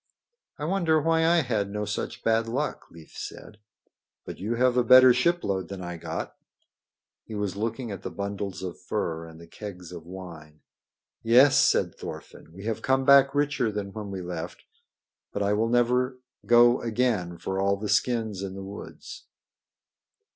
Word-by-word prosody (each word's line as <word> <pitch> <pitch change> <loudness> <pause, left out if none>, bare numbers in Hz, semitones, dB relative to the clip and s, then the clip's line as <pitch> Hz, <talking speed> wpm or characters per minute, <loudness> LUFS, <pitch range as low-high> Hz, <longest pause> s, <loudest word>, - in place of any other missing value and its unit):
"I 150 - -4
wonder 165 -3 +2
why 160 +1 +2
I 170 0 +4
had 110 -6 -1
no 105 +1 -3
such 105 - -4
bad 115 0 +2
luck," 135 +6 -3
Leif 80 -1 -15
said. 105 - -9 0.7
"But - - -8
you 110 +5 -2
have 125 +1 +2
a 125 - +3
better 130 +1 +8
shipload 125 - 0
than 95 -2 -7
I 90 -1 -6
got." - - -5 0.9
He 110 - -8
was 100 -2 -2
looking 115 +3 -3
at 100 - -6
the - - -5
bundles 100 -1 -5
of 90 -2 -6
furs 80 0 -3
and 80 0 -14
the 85 - -12
kegs 90 -1 -9
of 85 -2 -10
wine. 85 -5 -10 0.6
"Yes," 125 +5 +6
said - - +3
Thorfinn, - - -10
"we 95 +5 -11
have 115 -1 -2
come 130 0 +1
back 140 0 +6
richer 145 -6 +1
than 100 -2 -5
when 105 -2 -6
we 95 -1 -5
left. 85 -1 -6 0.7
But 100 - -2
I 100 +1 +1
will 110 +2 +1
never 125 +2 +2 0.3
go 120 +1 +6
again 110 -7 -1
for 95 +2 -3
all 100 +1 +2
the 105 +1 -5
skins 110 -1 0
in 95 -1 -5
the 95 - -7
woods." 100 +1 -10
105 Hz, 170 wpm, -26 LUFS, 95-125 Hz, 0.9 s, better